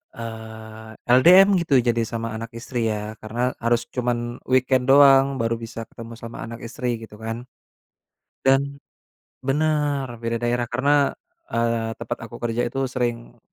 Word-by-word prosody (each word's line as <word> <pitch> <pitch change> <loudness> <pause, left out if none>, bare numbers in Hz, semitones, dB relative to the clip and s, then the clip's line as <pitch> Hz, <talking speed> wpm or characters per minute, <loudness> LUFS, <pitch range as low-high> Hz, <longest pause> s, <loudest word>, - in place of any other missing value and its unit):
eee, 110 -1 -9 0.3
LDM 180 +8 +8
gitu 165 -5 +1
jadi 120 -1 +1
sama 115 -1 -4
anak 115 +1 -6
istri 115 0 -2
ya 110 0 -4
karena 120 +4 -2
harus 115 0 +1
cuman 120 -1 -2
weekend 130 0 +2
doang 135 0 +6
baru 115 -2 0
bisa 115 0 -7
ketemu 115 0 -10
sama 115 0 -9
anak 115 0 -8
istri 125 +1 -2
gitu 105 -1 -12
kan. 115 +2 -5 1.0
Dan 140 +1 +2 0.7
bener 145 -1 +1
beda 115 0 -2
daerah 120 0 0
karena, 140 +4 +2 0.3
eee, 115 -1 -1
tempat 120 - -5
aku 120 - -11
kerja 120 0 0
itu 135 - -2
sering, 120 -1 -3
120 Hz, 140 wpm, -23 LUFS, 115-135 Hz, 1.0 s, LDM